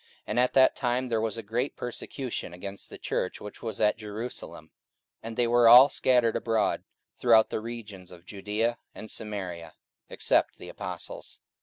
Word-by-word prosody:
And 110 - -1
at 125 0 +2
that 130 -1 +5
time 125 0 -1
there 115 -2 0
was 110 0 -2
a 115 - -5
great 120 +6 -2
persecution 125 -4 -5
against 100 +3 -8
the - - -9
church 90 - -3
which 105 - -10
was 115 -2 -5
at 105 0 +2
Jerusalem; 110 +3 -7 0.5
and 115 0 -7
they 120 - +3
were 120 0 +5
all 125 +4 +10
scattered 120 -3 +2
abroad 115 -1 0 0.3
throughout 115 -3 +4
the - - -1
regions 110 -5 -8
of 90 -1 -14
Judaea 105 +4 -2 0.2
and 110 - -8
Samaria, 90 -6 -5 0.3
except - - +1
the - - -10
apostles. - - -7
115 Hz, 165 wpm, -28 LUFS, 105-120 Hz, 0.5 s, all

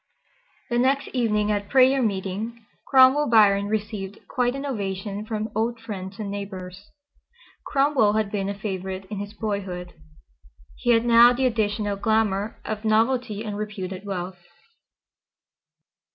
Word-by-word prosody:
The 240 - +2
next 270 +2 +1
evening 215 -4 +1
at 205 -1 -2
prayer 265 +1 +5
meeting 215 +2 -3 0.2
Cromwell 265 +2 +5
Biron 205 -3 +5
received 210 -2 -3
quite 245 0 0
an 275 +1 -5
ovation 205 -3 -4
from 220 -1 -3
old 230 +2 -1
friends 195 -4 -7
and 210 -3 -5
neighbors. 195 -1 -7 0.8
Cromwell 275 -7 +3
had 215 -2 0
been 200 -2 -2
a 200 - -4
favorite 190 -2 -5
in 205 - -4
his 205 +1 -6
boyhood. 195 -5 -4 0.8
He - - -3
had 230 0 +4
now 240 +1 +7
the 260 +2 0
additional 210 -3 0
glamour 215 -1 0
of 215 0 -4
novelty 225 0 +1
and 210 -2 -4
reputed 195 -3 -5
wealth. 185 -2 -5
210 Hz, 135 wpm, -24 LUFS, 200-235 Hz, 0.8 s, now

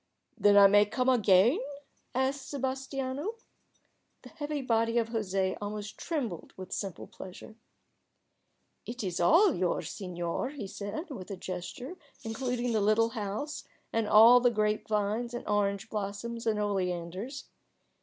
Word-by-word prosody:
"Then 205 -2 +5
I 200 - +9
may 205 +1 +6
come 250 +4 0
again?" 220 - +5 0.6
asked 265 +1 -1
Sebas 265 -1 -3
tiano. 275 - -3 0.9
The - - -11
heavy 290 -1 -4
body 230 -1 +1
of 230 -1 +1
José 195 -4 -1
almost 210 +1 -5
trembled 245 - -4
with 190 0 -8
simple 195 -5 -4
pleasure. 190 +4 -11 1.3
"It 240 0 -5
is 180 -3 -2
all 335 - +5
yours, 180 -1 -1
senor," 175 +4 -3
he 275 -7 -6
said, 205 - -6
with 195 -8 -7
a 195 - -5
gesture 185 - -6 0.3
including 245 +1 -2
the 220 -2 +1
little 215 +3 +3
house 225 +6 -4 0.3
and 225 -1 +1
all 230 +4 +8
the 245 0 +4
grape 215 -2 0
vines 215 +3 -1
and 240 - -6
orange 200 -1 0
blossoms 220 +3 -4
and 215 -1 +1
oleanders. 190 +5 -3
220 Hz, 140 wpm, -30 LUFS, 200-255 Hz, 1.3 s, I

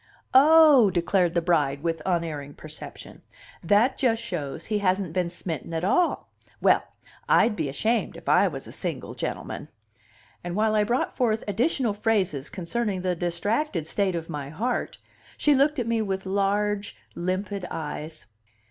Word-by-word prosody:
"Oh!" 295 -4 +7
declared 180 -1 +1
the 170 - +2
bride 150 -4 +1
with 165 -2 -1
unerring 160 -5 -2
perception, 155 0 -10 0.4
"that 210 +9 +3
just 230 -4 +2
shows 155 -11 -5
he 215 -1 -1
hasn't 185 -3 0
been 180 -1 0
smitten 165 -2 -5
at 160 - -2
all! 345 - +1 0.3
Well, - - +4 0.5
I'd 225 -2 +4
be 155 -6 -2
ashamed, 225 - -1
if - - -14
I - - +5
was - - -6
a - - -10
single - - -5
gentleman." - - -5 0.8
And 175 0 -4
while 215 +1 +2
I 210 -1 +3
brought 240 +4 -1
forth 225 -3 +1
additional 230 - +1
phrases 200 - 0
concerning 190 +2 -2
the 180 -1 0
distracted 175 - -1
state 190 +2 0
of 165 -1 -4
my 145 -4 -5
heart, 230 +11 -2 0.4
she 295 - +4
looked 285 +3 +3
at 245 - -1
me 230 -1 0
with 190 -2 -3
large, 200 +1 0 0.2
limpid 185 +2 -3
eyes. 155 -3 -6
190 Hz, 155 wpm, -25 LUFS, 170-225 Hz, 0.8 s, Oh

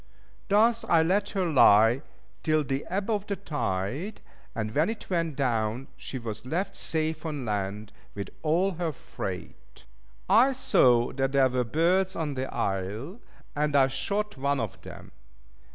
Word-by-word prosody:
Thus 225 +3 +4
I 165 -1 +4
let 195 +5 +1
her 185 - +2
lie 120 -5 +5 0.4
till 155 -1 +2
the 135 +1 -3
ebb 195 +2 -2
of 205 -2 -1
the 200 - -1
tide, 145 - -3 0.4
and 110 -1 -3
when 155 - +2
it 225 -3 -6
went 165 -4 0
down, 120 -2 -1
she 135 - -6
was 115 -3 -6
left 170 +10 -2
safe 160 -1 0
on 150 -5 -4
land 105 0 -3 0.2
with 100 -2 -5
all 170 +5 +2
her 165 -3 -1
freight. 65 - -8 0.4
I 235 +8 +5
saw 120 - +3
that 135 0 -1
there 135 -1 +4
were 125 0 0
birds 180 +9 +1
on 155 -3 -2
the 130 0 -4
isle, 105 - -3 0.4
and 150 0 0
I 135 -1 +6
shot 210 +8 -2
one 140 +1 0
of 115 -4 -5
them. - - -11
145 Hz, 155 wpm, -27 LUFS, 120-180 Hz, 0.4 s, I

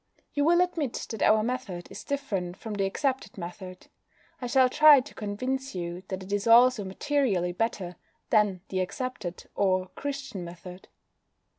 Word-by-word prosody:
You 290 0 +1
will 345 +2 +5
admit 330 -8 -1
that 225 - -5
our 215 0 +5
method 225 -8 -4
is - - -8
different 200 -11 -3
from 220 -1 -6
the 200 -1 0
accepted 260 +2 -2
method. 185 +1 -8 0.6
I 245 - -3
shall 260 +1 +5
try 300 +2 +7
to 260 +3 -8
convince 255 +5 -3
you 175 0 -4
that 190 0 -5
it 195 +2 -6
is 205 +2 -1
also 235 -1 +6
materially 195 -3 0
better 180 -3 -2 0.3
than 210 -5 +3
the 190 - -1
accepted, 185 -2 -4
or 185 -2 +1
Christian, 275 -5 -5
method. 180 +2 -10
210 Hz, 155 wpm, -28 LUFS, 185-260 Hz, 0.6 s, try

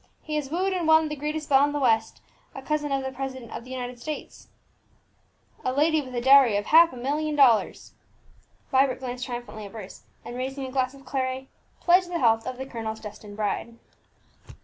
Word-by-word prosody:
He 305 - -4
has 285 -3 -3
wooed 370 +5 0
and 350 -3 -1
won 315 -1 +5
the 300 - -3
greatest 300 +1 -4
belle 275 0 +5
in 290 0 +1
the 290 - -1
West, 225 -4 +1 0.3
a 270 - -8
cousin 295 0 -1
of 270 -1 0
the 265 - -3
president 260 -2 -6
of - - -6
the - - -13
United 250 -1 -5
States, 305 +3 -7 1.2
a 255 - 0
lady 305 +3 +2
with 255 -3 -9
a 240 - -1
dowry 265 -4 +6
of 205 - -2
half 330 +2 +6
a 255 - -10
million 295 +5 -1
of 275 - +10
dollars!" 230 -4 0 0.8
Vibert 265 -1 +3
glanced 250 -1 -5
triumphantly 240 -4 -6
at 200 - -15
Bruce, 210 -4 -9 0.2
and 240 - -7
raising 265 +2 -4
a 260 - -7
glass 260 0 -1
of 275 -1 -16
claret, 260 0 -2 0.4
pledged 355 +1 +4
the 350 - -2
health 225 -4 +2
of 255 -1 -4
the 265 - -5
colonel's 225 -4 -5
destined 210 -1 -10
bride. 220 +2 -3
265 Hz, 205 wpm, -26 LUFS, 240-295 Hz, 1.2 s, of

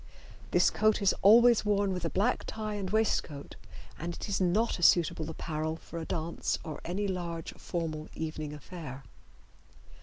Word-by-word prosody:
This - - +4
coat 215 0 +3
is 200 -2 +3
always 235 +3 +7
worn 200 -2 +1
with 180 -2 -4
a - - +1
black 195 +5 +1
tie 215 -1 -4
and 200 -3 -3
waistcoat, 190 -9 -1 0.4
and 170 +1 -4
it - - -6
is 200 -1 -1
not 190 +4 +1
a - - -6
suitable 165 -2 +4
apparel 155 0 -3
for 170 +1 -8
a 160 - -5
dance 165 0 -2
or 155 -2 -6
any 195 +4 -2
large 170 -3 -4
formal 155 -3 -4
evening 155 -2 -4
affair. 150 -2 -8
175 Hz, 160 wpm, -30 LUFS, 160-200 Hz, 0.4 s, always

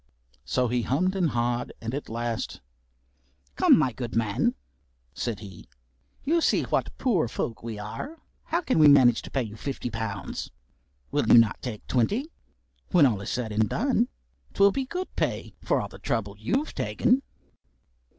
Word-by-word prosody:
So 125 -1 +1
he 120 +1 0
hummed 185 - 0
and 180 -4 +2
ha'ad 120 -1 -1
and 115 +2 -5
at 145 - -4
last, 115 0 -3 1.0
"Come, - - +6
my 130 - +2
good 120 0 -6
man," 110 -3 +1 0.6
said 110 - -3
he, 95 -9 -11 0.5
"you 330 +4 +2
see - - +3
what - - -1
poor 195 - +2
folk 115 0 -4
we 115 -2 -5
are; 105 - -6 0.3
how 335 +2 0
can 260 - +1
we 155 - +8
manage 130 -5 +6
to - - -10
pay 135 - 0
you 110 -2 -8
fifty 125 0 -4
pounds? 110 -4 -4 0.6
Will - - +1
you - - +8
not 115 -2 +4
take 110 -5 -6
twenty? 210 - 0 0.6
When 175 -6 +6
all 110 -7 +1
is 100 - -5
said 120 -3 -2
and 110 +1 +1
done, 245 -1 +1 0.5
't - - -12
will 200 - +7
be 270 +5 -2
good 360 +7 -5
pay - - -2
for - - +1
the - - -13
trouble 105 -4 -2
you've 265 - -1
taken." 255 +2 +1
120 Hz, 170 wpm, -27 LUFS, -, 1.0 s, we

